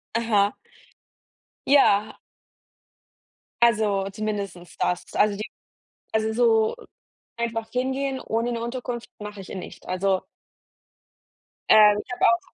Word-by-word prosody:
Aha. 215 Hz, -3 st, +2 dB, 1.1 s
Ja. 215 Hz, -7 st, +4 dB, 1.4 s
Also, 210 Hz, -4 st, +3 dB
zumindest 200 Hz, -4 st, -5 dB
das. 180 Hz, -, 0 dB
Also 205 Hz, -1 st, +3 dB
die 215 Hz, -, -4 dB, 0.7 s
also 220 Hz, 0 st, 0 dB
so 225 Hz, -2 st, +3 dB, 0.6 s
einfach 225 Hz, -1 st, -3 dB
hingehen 265 Hz, +1 st, -1 dB
ohne 230 Hz, +2 st, -1 dB
'ne 230 Hz, -1 st, -3 dB
Unterkunft 240 Hz, 0 st, -5 dB
mache 210 Hz, -1 st, -7 dB
ich 190 Hz, -, -12 dB
e -, -, -6 dB
nicht. 185 Hz, -, -9 dB
Also 185 Hz, +1 st, 0 dB, 1.4 s
ähm, 210 Hz, -1 st, +7 dB
ich -, -, -13 dB
habe -, -, +1 dB
auch 230 Hz, 0 st, +5 dB
220 Hz, 110 wpm, -24 LUFS, 200-235 Hz, 1.4 s, ähm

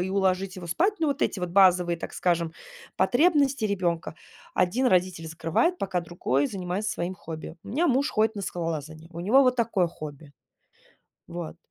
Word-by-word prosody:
и 185 Hz, +1 st, -2 dB
уложить 190 Hz, -1 st, 0 dB
его 175 Hz, -, -7 dB
спать. 375 Hz, -, +2 dB
Ну, 315 Hz, -, +2 dB
вот 280 Hz, -1 st, -1 dB
эти 190 Hz, -, 0 dB
вот 180 Hz, -, -2 dB
базовые, 180 Hz, -2 st, +5 dB
так -, -, -6 dB
скажем, 170 Hz, -2 st, 0 dB, 0.4 s
потребности 280 Hz, -3 st, +3 dB
ребенка. 175 Hz, -6 st, -1 dB, 0.4 s
Один 200 Hz, +9 st, +2 dB
родитель 180 Hz, -5 st, +1 dB
закрывает, 165 Hz, -, 0 dB
пока 190 Hz, -2 st, -1 dB
другой 155 Hz, -5 st, 0 dB
занимается 190 Hz, +2 st, -3 dB
своим 175 Hz, +2 st, -3 dB
хобби. 160 Hz, -1 st, -8 dB
У -, -, -10 dB
меня 305 Hz, +11 st, +1 dB
муж 270 Hz, +3 st, +2 dB
ходит 220 Hz, +1 st, +1 dB
на 200 Hz, -, -4 dB
скалолазание, 160 Hz, -3 st, -4 dB
у 170 Hz, -, -6 dB
него 230 Hz, +10 st, +5 dB
вот 255 Hz, -1 st, +3 dB
такое 220 Hz, -7 st, +1 dB
хобби. 150 Hz, -2 st, -10 dB, 1.0 s
Вот. 170 Hz, -1 st, -6 dB
185 Hz, 170 wpm, -26 LUFS, 170-220 Hz, 1.0 s, базовые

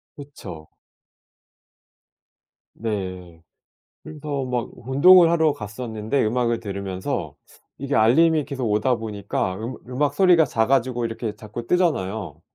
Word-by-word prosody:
그쵸. 95 Hz, -, -10 dB, 2.0 s
네. 95 Hz, -6 st, -5 dB, 0.6 s
그래서 145 Hz, -3 st, -5 dB
막 125 Hz, -2 st, -2 dB
운동을 165 Hz, +8 st, +6 dB
하러 160 Hz, -3 st, +3 dB
갔었는데 110 Hz, +3 st, -3 dB
음악을 120 Hz, +1 st, 0 dB
들으면서 100 Hz, -3 st, -4 dB, 0.4 s
이게 140 Hz, +1 st, -3 dB
알림이 150 Hz, +7 st, +4 dB
계속 130 Hz, -3 st, -4 dB
오다 110 Hz, +4 st, +2 dB
보니까 105 Hz, -4 st, -3 dB
음악 115 Hz, +5 st, -6 dB
음악 140 Hz, +3 st, 0 dB
소리가 180 Hz, -5 st, +5 dB
작아지고 120 Hz, 0 st, +1 dB
이렇게 115 Hz, -1 st, -4 dB
자꾸 115 Hz, +2 st, -8 dB
뜨잖아요. 105 Hz, -, -1 dB
120 Hz, 265 characters per minute, -23 LUFS, 105-140 Hz, 2.0 s, 운동을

